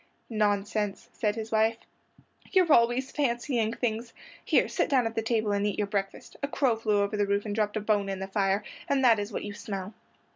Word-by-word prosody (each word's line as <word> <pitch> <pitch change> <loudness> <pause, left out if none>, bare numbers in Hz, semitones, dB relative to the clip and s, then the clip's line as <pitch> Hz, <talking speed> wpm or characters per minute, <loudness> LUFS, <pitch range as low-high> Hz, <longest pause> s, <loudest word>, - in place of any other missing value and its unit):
"Nonsense," 205 -1 0
said 210 -3 0
his 225 0 -5
wife, 220 +1 +3 0.7
"you're 365 -5 +5
always 240 +3 +3
fancying 240 -4 0
things. 230 0 -3 0.3
Here, - - +3
sit - - 0
down 260 -5 +3
at 225 - -2
the 225 - -1
table 220 -2 0
and 200 0 +1
eat 205 - -2
your 210 - +1
breakfast. 200 -1 -4
A 280 - 0
crow 270 -4 +1
flew 215 -2 +1
over 200 +1 -2
the 205 -1 +1
roof 200 +1 0
and 210 - -3
dropped 210 0 0
a - - -2
bone 205 -2 +1
in 195 - -2
the 190 - -4
fire, 195 +1 +1 0.3
and 270 -2 +2
that 230 -3 +6
is 205 +2 -4
what - - -4
you 205 - -5
smell." 195 -1 -6
215 Hz, 215 wpm, -28 LUFS, 205-235 Hz, 0.7 s, that